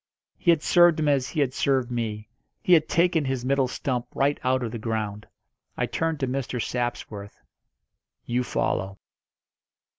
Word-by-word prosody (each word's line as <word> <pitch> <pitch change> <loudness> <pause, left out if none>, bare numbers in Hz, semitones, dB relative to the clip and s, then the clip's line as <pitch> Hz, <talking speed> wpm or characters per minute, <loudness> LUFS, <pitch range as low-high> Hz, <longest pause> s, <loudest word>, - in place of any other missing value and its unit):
He 175 - -1
had 165 -3 +4
served 175 -2 +5
him 155 - +1
as 135 -3 +2
he 155 - -1
had 130 -2 +1
served 130 -3 +1
me 110 -3 -3 0.4
he 180 - +4
had 155 -2 +4
taken 170 -2 +3
his 130 -2 -2
middle 135 0 +2
stump 125 -1 -3
right 140 +1 +1
out 130 0 +1
of 115 - -3
the 115 - -5
ground. 105 -2 -3 0.5
I - - +1
turned 160 -2 -2
to 135 - +1
Mr. 125 -1 -3
Sapsworth. 115 -4 -4 0.9
"You 125 +1 0
follow." 95 -4 -2
130 Hz, 160 wpm, -25 LUFS, 120-145 Hz, 0.9 s, served